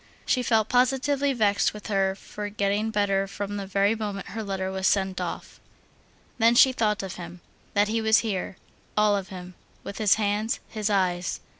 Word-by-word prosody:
She 255 - +1
felt 225 -3 +2
positively 270 +3 +2
vexed 210 -5 +1
with 210 - -10
her 195 -2 +1
for 205 +1 -7
getting 205 +1 0
better 200 -2 +1
from 205 +1 -5
the 200 -1 -5
very 200 +2 +2
moment 205 -3 -5
her 220 - -5
letter 190 -2 -3
was 190 0 0
sent 190 -2 +1
off. 175 - -6 0.8
Then 230 +1 +5
she 260 +2 +7
thought 210 -5 0
of 190 -1 -6
him, 175 0 -9 0.4
that 205 +1 +4
he 225 +1 0
was 220 +1 +4
here, 190 -3 -3 0.4
all 210 -1 +4
of 195 -2 -3
him, 180 -2 -9 0.3
with 200 - -7
his 210 -2 +4
hands, 210 +1 -1
his 215 -1 -3
eyes. 185 -3 0
205 Hz, 180 wpm, -26 LUFS, 195-220 Hz, 0.8 s, she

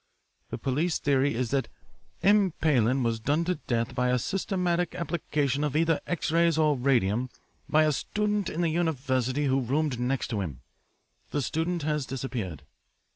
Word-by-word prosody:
The - - -4
police 155 +6 0
theory 140 -2 +1
is 120 -1 -1
that 135 -1 +1 0.6
M. 200 -3 +4
Pailin 130 -4 +2
was 115 -1 0
done 145 +8 0
to 180 - +1
death 115 -1 0
by 125 0 +1
a 125 - +3
systematic 180 - -1
application 150 -5 -1
of 150 -1 -1
either 165 0 +2
X 175 -3 -1
rays 165 -1 +3
or 155 -2 +3
radium 125 -2 +1 0.4
by 155 +1 +5
a 155 - +3
student 210 +5 -1
in 165 - -3
the 170 - +2
university 140 -5 0
who 135 0 +2
roomed 135 +1 0
next 125 +2 -1
to 105 -4 -1
him. 70 -9 -5 0.7
The 145 - -1
student 165 +4 -1
has 150 -2 -1
disappeared.' 115 - -4
145 Hz, 165 wpm, -27 LUFS, 125-165 Hz, 0.7 s, by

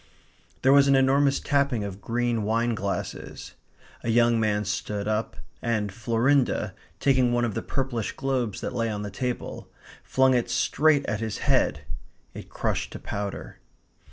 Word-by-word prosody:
There 135 - +6
was 140 0 +6
an 140 - +5
enormous 135 +1 +3
tapping 140 -6 +1
of 100 0 -6
green 120 +1 0
wine 115 +3 +1
glasses. 100 -2 -5 0.5
A - - -2
young 120 0 +4
man 105 -1 +1
stood 100 +1 -3
up, 110 +1 -1 0.2
and 110 -4 -1
Florinda, 120 +5 +1 0.3
taking 130 -3 +3
one 120 0 +2
of 110 - -2
the - - -2
purplish 130 -5 -2
globes 130 -7 -2
that - - -4
lay 115 -2 0
on 105 -1 -3
the 105 - -5
table, 125 +4 -4 0.3
flung 130 0 +3
it 120 -2 +1
straight 150 -2 +2
at 105 - -2
his 110 -2 -3
head. 75 - +2 0.5
It - - -9
crushed - - -2
to - - -7
powder. 100 -1 -5
120 Hz, 155 wpm, -26 LUFS, 105-130 Hz, 0.5 s, There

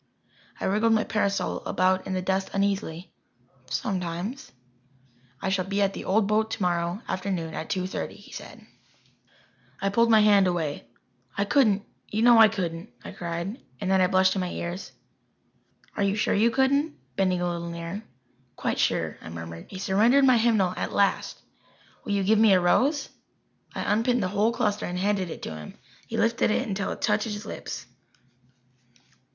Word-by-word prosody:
I - - -3
wriggled 215 +4 +2
my 220 - +3
parasol 200 -2 -1
about 185 0 +1
in 190 - -2
the 185 -1 -1
dust 190 +1 0
uneasily. 195 -3 -1 0.6
"Sometimes." 185 +6 -3 0.9
"I 190 - -2
shall 190 -1 0
be 200 +1 -2
at 195 0 +1
the - - -7
old 205 +2 +2
boat 215 +2 +1
tomorrow 175 -1 -1
afternoon 185 -4 -3
at 160 - -5
two 185 -2 -1
thirty," 185 - -4
he - - -15
said. - - -10 1.1
I 195 - 0
pulled 230 +3 +3
my 220 -1 +6
hand 205 -2 +5
away. 160 -7 -2 0.5
"I 200 - +1
couldn't 210 -5 +3 0.2
you 215 +2 -1
know 240 -1 +7
I 220 - +9
couldn't," 180 -3 -4 0.2
I - - -6
cried 170 +8 -5 0.2
and 195 -2 -1
then 190 -1 +4
I 185 - +5
blushed 185 0 +3
to 195 - -2
my 180 -1 -2
ears. 175 +2 -5 1.0
"Are - - -2
you 200 0 +2
sure 210 - +1
you 220 +3 +4
couldn't?" 280 +5 +1 0.2
bending 185 -2 +1
a 180 - 0
little 170 -1 -3
nearer. 170 +4 -5 0.5
"Quite - - -2
sure," - - 0
I - - -9
murmured. 85 0 -8
He 190 - -8
surrendered 220 +9 +4
my 255 -3 +5
hymnal 215 -6 +2
at - - -3
last. 200 -1 +1 0.7
"Will 205 - -1
you 200 -1 +1
give 215 +3 +3
me 220 -3 +6
a 185 - +5
rose?" 270 - +2 0.7
I - - -2
unpinned 230 +1 +1
the 185 - -1
whole 210 +3 +2
cluster 210 -4 -1
and 180 - -4
handed 190 -1 0
it - - -8
to 80 - -5
him. 75 -1 -10 0.3
He 225 - -4
lifted 230 0 +2
it - - 0
until 200 -1 -2
it - - -7
touched 210 +1 +2
his 210 -1 -5
lips. - - -6
195 Hz, 180 wpm, -26 LUFS, 180-220 Hz, 1.1 s, I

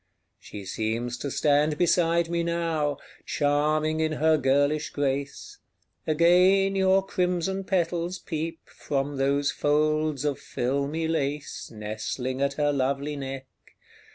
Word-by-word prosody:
She 100 -2 -9
seems 115 +4 -2
to 140 - -3
stand 150 +2 +2
beside 170 -1 +2
me 170 0 -1
now, 165 -4 -1 0.3
Charming 155 +2 +1
in 155 0 0
her 160 +1 +3
girlish 145 +1 +1
grace; 140 0 -3 0.5
Again 180 +5 +4
your 190 0 +3
crimson 180 +1 -1
petals 175 -1 -1
peep 165 -1 -5
From 140 0 -3
those 140 +1 +1
folds 150 -1 +1
of 145 -2 -1
filmy 140 +6 -2
lace 145 -2 -3
Nestling 110 +5 -4
at 140 0 +1
her 145 0 +1
lovely 140 +2 -1
neck. 135 -1 -6
150 Hz, 120 wpm, -26 LUFS, 140-165 Hz, 0.5 s, Again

